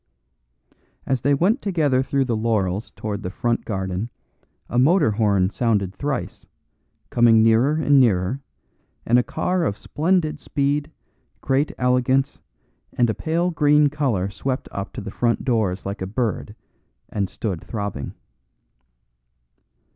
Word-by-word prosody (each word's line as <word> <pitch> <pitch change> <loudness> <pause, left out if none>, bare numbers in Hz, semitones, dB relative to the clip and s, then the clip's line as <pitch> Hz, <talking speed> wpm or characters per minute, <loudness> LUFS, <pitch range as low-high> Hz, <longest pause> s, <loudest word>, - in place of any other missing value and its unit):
As 130 -3 0
they 140 +2 +3
went 200 - +2
together 155 -10 +1
through 135 0 0
the 120 -3 -1
laurels 110 -3 -1
towards 105 -1 -5
the 90 - -4
front 115 +4 -1
garden 95 +1 -3 0.6
a 120 - 0
motor 150 - +4
horn 100 -3 +2
sounded 100 -3 0
thrice, 125 -7 -4 0.6
coming 115 -2 +5
nearer 115 +6 +4
and 145 -3 +4
nearer, 110 +1 +2 0.6
and 120 +2 +4
a - - +2
car 180 +6 -1
of 105 -10 -1
splendid 155 -1 0
speed, 145 +1 -1 0.5
great 140 +2 0
elegance, 125 +2 +1 0.5
and 120 -2 +2
a - - -2
pale 170 +6 -1
green 150 -2 +4
colour 130 -11 0
swept 130 +5 -3
up 100 0 -5
to 125 - -6
the 100 - -7
front 120 +2 0
doors 110 -7 0
like 100 0 -5
a 95 - -2
bird 110 -1 -2 0.5
and 100 -3 -2
stood 95 -6 -4
throbbing. 100 -10 -5
120 Hz, 135 wpm, -22 LUFS, 100-145 Hz, 0.6 s, coming